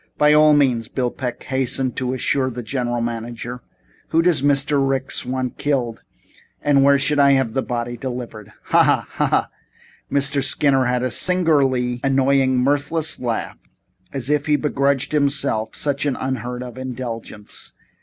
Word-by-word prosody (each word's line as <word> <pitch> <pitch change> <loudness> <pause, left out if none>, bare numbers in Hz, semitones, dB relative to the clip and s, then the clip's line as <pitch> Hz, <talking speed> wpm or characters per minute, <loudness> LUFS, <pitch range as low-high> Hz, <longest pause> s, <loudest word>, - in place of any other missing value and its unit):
"By 150 0 +4
all 150 0 +6
means," 125 -6 +2
Bill 125 -1 -2
Peck 125 -3 -5
hastened 130 -1 -1
to 130 0 -1
assure 130 +1 0
the 125 -1 -6
general 120 -1 -2
manager. 120 +1 -5 0.5
"Who 165 +1 +2
does 175 -5 +3
Mr. 145 0 +2
Ricks 135 -1 -1
want 130 -1 -3
killed 130 -6 -1 0.6
and 140 -2 +3
where 140 0 +5
will 140 +1 +3
he 140 - +5
have 130 -4 0
the 135 - 0
body 120 -1 -4
delivered?" 120 -4 -7
"Hah - - +3
hah! - - +2
Hah - - -1
Hah!" - - +1 0.6
Mr. 140 0 +2
Skinner 135 -2 +3
had 125 0 0
a 130 - -1
singularly 135 -9 +2
annoying, 135 -1 +2
mirthless 145 +3 0
laugh, 120 -3 -3 0.5
as 135 -3 -2
if 150 0 0
he 150 - +3
begrudged 140 -2 0
himself 140 -7 0
such 145 0 -1
an 135 - 0
unheard 125 -1 -4
of 125 0 -9
indulgence. 120 -5 -7
130 Hz, 155 wpm, -20 LUFS, 125-140 Hz, 0.6 s, all